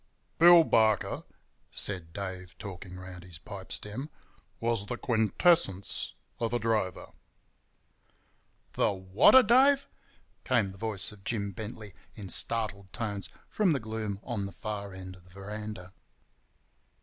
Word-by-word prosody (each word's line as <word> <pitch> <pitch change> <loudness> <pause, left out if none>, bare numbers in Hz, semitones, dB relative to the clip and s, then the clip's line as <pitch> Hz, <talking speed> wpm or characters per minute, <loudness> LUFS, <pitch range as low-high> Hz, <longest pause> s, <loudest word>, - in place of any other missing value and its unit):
"Bill 170 0 +9
Barker," 110 -7 +2 0.4
said 90 -5 0
Dave, 95 -1 -6
talking 90 -2 -8
round 90 -1 -9
his 90 -3 -9
pipe 95 +3 -10
stem, 120 +9 -2 0.5
"was 115 -3 -1
the 125 - -3
quintessence 110 - +1 0.3
of 115 0 -1
a - - +3
drover—" 110 -5 -1 1.6
"The - - +2
whatter, 95 - +6
Dave?" 270 +5 +5 0.6
came 115 -7 +2
the 95 - -14
voice 105 -4 0
of 105 -2 -15
Jim 100 -3 -2
Bentley, 105 0 -8 0.2
in 100 -4 -8
startled 100 -4 +1
tones, 100 -4 -4 0.2
from 195 -6 +2
the 140 - 0
gloom 110 -3 -4
on 110 -6 -3
the - - -9
far 105 -3 -5
end 95 0 -9
of 90 - -20
the 90 - -19
veranda. 100 0 -8
105 Hz, 130 wpm, -29 LUFS, 95-115 Hz, 1.6 s, Bill